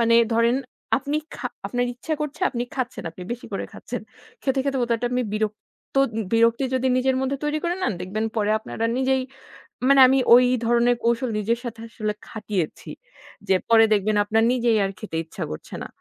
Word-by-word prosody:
মানে 230 0 +4 0.2
ধরেন 230 +2 +3 0.4
আপনি 285 +2 -2 0.2
খা - - -3 0.2
আপনার 245 0 0
ইচ্ছা 310 +6 -3
করছে, 300 +3 -4
আপনি 240 -2 -2
খাচ্ছেন। 250 -8 -3
আপনি 180 - -11
বেশি 240 - -7
করে - - -2
খাচ্ছেন। - - -6 0.4
খেতে, 270 -1 0
খেতে 275 -1 0
হটাৎ 235 -1 0
আমি 250 0 +1
বিরক্ত 215 0 -2 0.7
বিরক্তি 230 +3 +3
যদি 260 0 +1
নিজের 260 0 +2
মধ্যে 265 +1 -1
তৈরি 295 +1 0
করে 345 +1 +1
নেন, 235 - +1
দেখবেন 200 +5 -3
পরে 210 -1 +1
আপনার 220 - -9
আর 230 - +2
নিজেই 265 0 +2 0.7
মানে 275 0 +6
আমি 265 +1 +4
ঐ - - +12 0.3
ধরনের 240 +1 +3
কৌশল 235 +1 +1
নিজের 230 +3 0
সাথে 230 -2 -6
আসলে 215 -2 -3
খাটিয়েছি। 205 -7 -4 0.6
যে 190 - +4
পরে 225 -1 +7
দেখবেন 210 +1 +1
আপনার 220 +2 +2
নিজেই 235 -3 +2
আর 195 - -2
খেতে 180 -7 -5
ইচ্ছা 160 - -6
করছে 75 - -8
না। - - -6
235 Hz, 185 wpm, -24 LUFS, 215-260 Hz, 0.7 s, ঐ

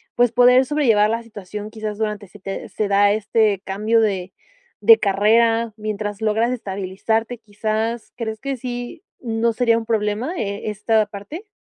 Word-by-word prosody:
pues, 245 -1 +3
poder 250 +2 +5
sobrellevar 235 -8 +3
la 230 +1 -2
situación 210 -1 -8
quizás 215 -2 -5
durante 210 -2 -3
se 210 - -15
te 195 0 -6
se 215 - -2
da 200 0 +4
este 215 -1 +1
cambio 215 +4 +1
de 190 -4 -1 0.5
de 455 -1 +8
carrera 225 +3 +2
mientras 210 -1 -4
logras 220 +2 +1
estabilizarte 220 +3 -2
quizás 220 +2 -3
¿crees 220 -2 -4
que 275 0 -3
sí 245 - -6 0.2
no 230 -1 0
sería 230 -1 +2
un 230 - -4
problema, 220 +6 -1
eh, 200 +1 -3
esta 215 +1 +1
parte? 215 - -9
220 Hz, 155 wpm, -21 LUFS, 205-230 Hz, 0.5 s, de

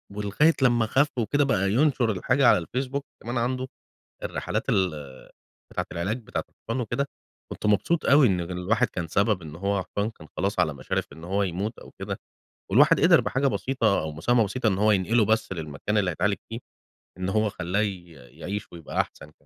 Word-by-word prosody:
ولغاية 105 +11 +3
لمّا 120 -3 +4
خَفّ 140 +6 +2
وكده، 145 +6 +2
بقى 100 -7 +1
ينشر 130 -4 +3
الحاجة 125 +7 +2
على 105 - +7
الفيسبوك 130 - -3 0.2
كمان 120 +2 -3
عنده، 130 +2 -1 0.6
الرحلات - - -3
ال 95 -2 +3 0.8
بتاعة - - -2
العلاج 95 +8 -2
بتاعة - - -3
الحصان 115 +3 -5
وكده، 140 +5 -1 0.4
كنت - - -6
مبسوط 105 - +2
أوي 140 -2 +6
إن 90 -3 +1
الواحد 90 +5 0
كان 85 -2 -5
سبب 100 +2 +1
إن 75 -1 -9
هو 100 +1 -1
حصان 100 +4 -2
كان 80 -7 -15
خلاص 100 +2 -1
على 80 -1 +2
مشارف 65 -2 -2
إن 80 +2 -13
هو 100 +3 0
يموت 100 +5 -3
أو - - -13
كده، - - -4 0.5
والواحد - - +6
قدر - - +6
بحاجة 135 +2 0
بسيطة، 130 -6 +1
أو 80 0 -4
مساهمة 110 +9 +2
بسيطة، 110 +4 -1
إن 95 -2 +2
هو 105 +1 +4
ينقلُه 105 +4 +3
بس 110 -1 +1
للمكان 80 +5 -3
اللي 95 -3 +2
هيتعالج 100 +5 0
فيه، 115 +1 -5 0.6
إن 95 - -2
هو 110 +2 +2
خلّاه 90 +2 -2
ي 95 -4 -3
يعيش 80 +10 -7
ويبقى 85 -3 -3
أحسن - - -4
كمان. 75 - -16
105 Hz, 185 wpm, -26 LUFS, 90-120 Hz, 0.8 s, على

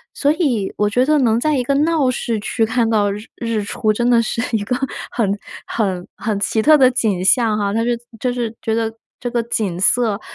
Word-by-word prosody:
所 290 +1 +2
以 270 - 0
我 210 - +2
觉 245 +4 +2
得 305 +1 +3
能 230 -3 +2
在 300 +3 +1
一 250 - 0
个 275 - 0
闹 300 -2 +2
市 235 -3 -2
区 225 +2 -1
看 230 0 +1
到 205 -2 +2
日 210 +2 -6
日 230 -3 -2
出， 215 +1 0
真 235 +3 0
的 235 -1 +5
是 230 +1 -2
一 210 - 0
个 250 +5 -1 0.4
很 205 -3 0 0.3
很 190 -5 -2
很 215 -2 -2
奇 220 +2 0
特 305 +6 +6
的 260 -2 +6
景 210 -7 0
象 225 0 +3
哈， 200 -1 -1
它 225 +1 +1
是 240 0 0 0.2
就 250 +2 0
是 235 -2 -3
觉 220 - -1
得 225 -1 -1 0.3
这 245 - -3
个 240 - +1
景 210 -7 -2
色 215 +1 +2
230 Hz, 240 characters per minute, -19 LUFS, 210-250 Hz, 0.4 s, 特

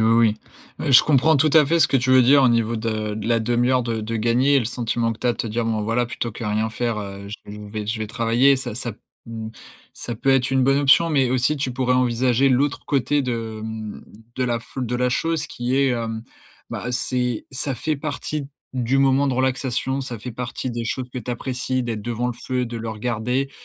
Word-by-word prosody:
oui. 110 -1 +3 0.5
Heu, - - +1
je 125 - +9
comprends 150 +1 +4
tout 155 +3 +3
à 155 -3 +6
fait 170 +3 +2
ce 155 - +6
que 135 - +2
tu 130 +2 -2
veux 130 -1 +7
dire 140 +3 +6
au 130 - +5
niveau 115 0 +1
de 110 -1 -2
de 110 +1 -4
la 115 -1 +3
demi-heure 120 +2 +2
de 115 -1 -2
de 115 +1 -3
gagnée 120 +5 +2
et - - +6
le 120 - -1
sentiment 115 0 -1
que 110 - -11
tu - - -3
as 120 - +4
de - - -11
te - - -3
dire: 115 +2 -1
«Bon, 110 -2 0
voilà, 115 +2 0
plutôt 115 -1 -4
que 115 - -8
rien 110 +1 0
faire, 115 -2 -2
heu, 100 -1 -7
je 105 - -6
vais - - -7
je 105 -1 -9
vais 105 -1 -4
je 110 +1 -2
vais 110 - -3
travailler». 120 +4 +3
Ça 120 -4 -5
ça, 120 -2 -3 0.3
mmh, 115 -1 -6 0.4
ça 120 - -6
peut 135 +5 0
être 135 -1 +3
une 130 -1 +3
bonne 135 +1 +3
option, 145 +4 +5
mais 135 -4 +3
aussi 130 +4 +1
tu 130 -2 -1
pourrais 125 0 0
envisager 125 +1 +2
l'autre 140 +3 +1
côté 145 +1 +1
de, 115 -4 -3
mmh, 110 -1 -6 0.4
de 130 - 0
la 120 -1 0
fl 125 +2 -6
de 125 +2 -1
la 125 0 +1
chose 165 +2 -1
qui 120 +2 -2
est, 140 0 +3
hem, 115 -2 -2 0.5
bah, - - -4
c'est 125 -2 -1
ça 135 +1 -2
fait 150 +5 -2
partie 145 0 -4 0.3
du 130 +2 +1
moment 135 +1 +3
de 135 - +1
relaxation, 130 +1 -1
ça 120 -4 -6
fait 125 +4 -7
partie 125 +2 -4
des 120 -1 -4
choses 125 +4 -3
que 125 - -9
tu 125 +1 -6
apprécies 130 +1 -2
d'être 115 -3 -4
devant 120 +2 -2
le 125 - -2
feu 125 +1 -3
et - - +1
de 115 - -6
le 115 0 -4
regarder, 120 +4 -2
125 Hz, 245 wpm, -22 LUFS, 115-130 Hz, 0.5 s, je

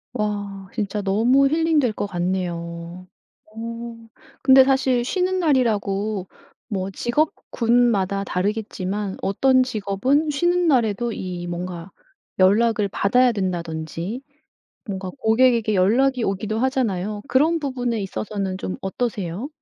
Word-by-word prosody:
와 205 -3 -3
진짜 210 -2 -2
너무 230 +8 +3
힐링될 310 -5 +2
것 205 - -3
같네요. 175 -1 -4 0.4
오. 230 +1 -8 0.4
근데 265 0 +8
사실 260 -2 +2
쉬는 370 +7 0
날이라고 215 - 0 0.4
뭐 195 -3 -3
직업군마다 235 -6 +1
다르겠지만 200 0 -3
어떤 255 +6 +3
직업은 255 +7 0
쉬는 345 +4 +1
날에도 240 -4 +2
이 180 -3 -5
뭔가 175 +1 -5 0.5
연락을 210 +2 +3
받아야 245 +6 +3
된다든지 175 - -4 0.7
뭔가 190 -3 -4
고객에게 230 -2 +3
연락이 245 +7 +3
오기도 210 +2 -2
하잖아요. 215 -6 -1
그런 310 +5 +3
부분에 250 -6 -2
있어서는 195 -1 -4
좀 185 - -4
어떠세요? 200 +1 -3
215 Hz, 265 characters per minute, -22 LUFS, 190-255 Hz, 0.7 s, 근데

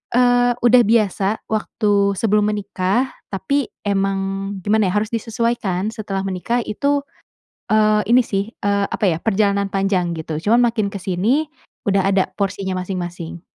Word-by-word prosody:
eee, 245 0 +4
udah 245 +1 +6
biasa 210 -2 +1
waktu 205 -2 +1
sebelum 210 0 +2
menikah, 200 +4 -1 0.2
tapi 255 +7 -1 0.2
emang, 195 0 -1
gimana 215 0 +2
ya, 180 - -1
harus 220 - -10
disesuaikan 225 -4 -1
setelah 200 -4 -4
menikah 195 +6 -1
itu, 280 +7 0 0.7
eee, 215 0 +4
ini 245 +2 +6
sih, 200 0 -2
eee, 200 0 0
apa - - -1
ya, 160 - 0
perjalanan 200 -2 +1
panjang, 195 -3 0
gitu. 160 -1 -4
Cuman 230 +6 +3
makin 215 -4 0
kesini 200 - 0 0.4
udah 195 -1 +2
ada 195 -1 +2
porsinya 195 -2 -2
masing-masing. 175 -2 -5
200 Hz, 135 wpm, -20 LUFS, 195-225 Hz, 0.7 s, udah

